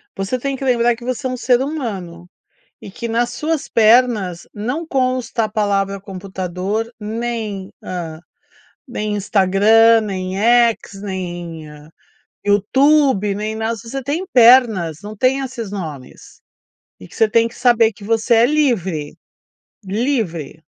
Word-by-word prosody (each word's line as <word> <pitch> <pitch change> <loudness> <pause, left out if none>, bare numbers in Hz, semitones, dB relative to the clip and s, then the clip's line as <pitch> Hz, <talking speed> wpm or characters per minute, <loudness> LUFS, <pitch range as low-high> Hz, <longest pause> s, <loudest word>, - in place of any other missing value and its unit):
você 195 +6 -2
tem 275 +2 -2
que 265 - -7
lembrar 240 -2 +2
que 235 - -14
você 255 +1 -3
é - - -3
um 255 - -3
ser 250 0 +2
humano 200 - -5 0.5
e - - -11
que 235 +4 -6
nas 235 +1 0
suas 305 +4 -3
pernas 220 -6 +3
não 250 +11 -4
consta 255 -5 0
a - - -2
palavra 200 -2 0
computador, 190 +3 -4
nem 215 -3 -4
hã, 165 -3 -6 0.7
nem 215 -4 -3
Instagram, 210 +3 +4
nem 190 -3 -4
X, 230 -3 +2
nem 175 -5 -6 0.8
YouTube, 215 +1 +3
nem 215 +2 -4
nada. 225 +1 -1
Se 230 +2 -11
você 270 +1 -4
tem 310 +8 -2
pernas, 230 - +5
não 210 +1 -8
tem 260 +5 +2
esses 240 -6 -6
nomes 155 -10 -8 0.6
e 90 - -12
que - - -16
você 225 - +3
tem 230 +1 +3
que 230 - -13
saber 235 -3 +3
que 200 - -15
você 225 +3 +1
é 230 - +6
livre. 195 - 0 0.7
Livre! 195 - -2
220 Hz, 140 wpm, -18 LUFS, 195-245 Hz, 0.8 s, é